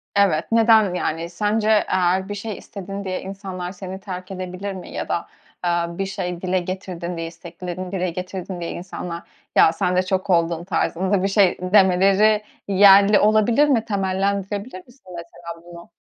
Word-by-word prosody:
Evet. 195 -5 +2
Neden, 225 -4 +5
yani, 165 -1 -2
sence 210 +4 0 0.2
eğer 185 +1 +1
bir 205 - -3
şey 205 0 -5
istedin 200 0 -7
diye 185 -1 -3
insanlar 190 -2 -6
seni 190 0 -8
terk 185 -1 -7
edebilir 185 +1 -5
mi 185 -2 -9
ya - - -5
da, 170 - -2 0.4
aaa, 170 -1 -1
bir 195 - -1
şey 180 -3 -4
dile 185 0 0
getirdin 180 -1 -5
diye, 165 0 -4
isteklerini 175 +2 -7
dile 185 -2 -1
getirdin 180 +1 -6
diye 170 - -4
insanlar, 175 -1 -6 0.3
"Ya, 160 - +6
sen 180 +2 0
de 185 - +3
çok 185 +1 -2
oldun!" 170 -1 +1
tarzında 190 +1 0
bir - - +2
şey 195 -2 +3
demeleri 195 +3 +4 0.2
yerli 200 +1 +6
olabilir 215 +7 +4
mi? 235 -6 +2
Temellendirebilir 195 0 -2
misin 245 -8 -16
mesela 170 0 -9
bunu? 170 0 -13
185 Hz, 160 wpm, -22 LUFS, 175-200 Hz, 0.4 s, Ya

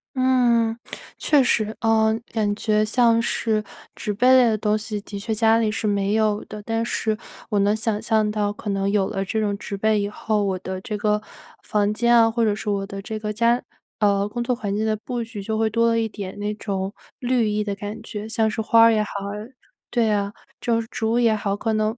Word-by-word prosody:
嗯， 245 -3 +3 0.4
确 295 -3 +4
实， 220 -3 +1
呃 220 -1 +3 0.2
感 210 -2 +1
觉 215 0 +1
像 230 +1 +3
是 220 -2 0 0.3
植 210 - -3
被 220 +5 +2
类 250 -2 +6
的 220 - +1
东 210 0 +1
西， 215 0 -4
的 200 0 -7
确 220 +2 -2
家 225 +1 +4
里 220 -2 +1
是 220 - -3
没 200 0 +1
有 215 -1 +1
的， 210 - -8
但 225 +1 -1
是 220 -1 -1 0.3
我 210 -3 +1
能 200 +1 +3
想 220 -1 -1
象 215 -1 +2
到， 210 -1 0
可 205 0 -5
能 195 0 0
有 200 -2 +2
了 195 -2 -2
这 210 +3 -2
种 205 -2 0
植 200 0 -6
被 215 +1 +2
以 200 - -2
后， 210 0 -1
我 190 -2 0
的 185 0 -5
这 210 +2 -4
个 210 0 +1 0.4
房 210 0 +1
间 235 +2 +3
啊 225 -1 +6
或 230 +1 0
者 210 -2 +2
是 215 0 -4
我 200 -1 -1
的 195 0 -7
这 215 +1 -5
个 210 0 -3
家 235 +3 +2 0.4
呃 200 -2 +2
工 240 +3 -3
作 250 +1 0
环 205 -4 -3
境 215 - 0
的 220 -1 +1
布 240 +2 -4
局， 225 -3 -7
就 220 +2 -2
会 225 0 +2
多 230 +2 +2
了 230 0 +2
一 225 -1 -1
点 200 -3 -7
那 205 +1 -2
种 195 -2 -3 0.3
绿 245 -2 +1
意 210 0 0
的 200 -1 -3
感 205 +2 -6
觉。 210 -1 -6
像 220 0 +1
是 220 - -2
花 230 +1 +6
也 215 -1 +2
好 210 - -7 0.8
对 235 -3 +2
啊， 205 -1 0 0.3
就 230 -1 +1
是 225 - -9
竹 225 +2 0
也 230 -2 +4
好， 200 -1 -1
可 220 +2 -1
能 215 +1 0
215 Hz, 245 characters per minute, -23 LUFS, 205-225 Hz, 0.8 s, 类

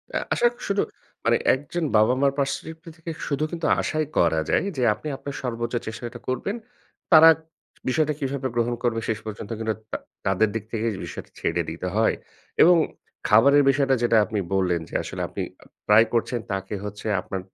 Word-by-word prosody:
আ - - +3 0.2
আশা 240 - +4
ক - - -16
শুধু, 200 0 +1 0.4
মানে - - +4 0.2
একজন 145 +5 -3
বাবা-মার 130 +6 +4
পারস্পেক্টিভ 160 +3 -3 0.2
থেকে 165 0 -6 0.2
শুধু 145 +1 -1
কিন্তু 170 -2 -4 0.2
আশাই 155 0 -1
করা 80 -2 +3
যায়। - - +2
যে, 125 - +1
আপনি 105 +9 -9
আপনার 140 0 -7
সর্বোচ্চ 120 -1 -3
চেষ্টাটা 120 +2 -6
করবেন। 130 - -2 0.6
তারা 160 0 +10 0.6
বিষয়টা 150 +2 +2
কিভাবে 135 -1 -2
গ্রহণ 120 0 +1
করবে 115 -2 +1
শেষ 110 -1 0
পর্যন্ত 110 -1 -7
কিন্তু 110 -1 -1 0.2
তা - - -1 0.3
তাদের 100 +3 +3
দিক 115 - -2
থেকে 115 0 -2 0.2
বিষয়টা - - -8
ছেড়ে 85 - 0
দিতে 85 +3 -5
হয়। 110 0 +3 0.5
এবং 175 +2 +8 0.5
খাবারের 140 +7 +6
বিষয়টা 135 -1 +3
যেটা 115 -1 +4
আপনি 110 -1 -2
বললেন 90 -3 +1
যে - - -17
আসলে - - -5
আপনি - - -5 0.2
অ - - -22 0.2
ট্রাই 105 +2 +7
করছেন। 120 +1 0
তাকে 95 +1 -3
হচ্ছে 105 +1 -6
আপনার 95 - -5
120 Hz, 175 wpm, -24 LUFS, 110-145 Hz, 0.6 s, তারা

